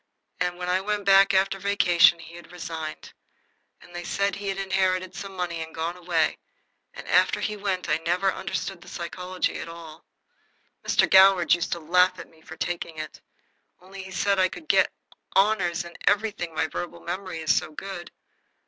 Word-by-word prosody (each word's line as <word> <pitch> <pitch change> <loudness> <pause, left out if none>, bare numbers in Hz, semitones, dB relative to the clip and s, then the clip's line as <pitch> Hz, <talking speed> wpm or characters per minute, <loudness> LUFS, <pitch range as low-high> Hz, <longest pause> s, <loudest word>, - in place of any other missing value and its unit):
And 180 0 -1
when 180 0 -5
I 185 +1 +1
went 205 0 -2
back 195 0 +6
after 195 0 +2
vacation 180 -3 +4
he 165 0 -12
had 175 0 -12
resigned, 165 -3 -7 0.7
and 175 - -17
they 175 - -5
said 200 +3 0
he 200 +1 -6
had 195 0 -2
inherited 190 -1 0
some 195 0 -8
money 175 -2 -3
and 160 0 -8
gone 165 +2 -2
away, 170 -3 0 0.5
and - - -11
after - - +3
he 210 - -2
went 195 -4 -2
I - - +2
never 180 +4 0
understood 195 -1 -4
the - - -15
psychology 180 +1 -3
at - - -6
all. 165 -2 -11 0.8
Mr. - - +3
Goward 190 -3 +6
used 175 0 0
to 170 - -4
laugh 180 +3 +3
at - - -10
me 160 -1 -22
for 160 0 -11
taking 170 -2 -4
it, 155 0 -7 0.6
only 190 +2 -10
he 190 - -10
said 200 +1 +1
I 185 0 +4
could 315 - -10
get - - +4 0.4
honors 190 -4 +2
in 170 - -11
anything, 205 -5 +1
my 155 - +1
verbal 170 +1 -6
memory 185 0 -5
is 160 - +3
so 155 - -1
good. 175 +2 -7
180 Hz, 185 wpm, -25 LUFS, 170-195 Hz, 0.8 s, back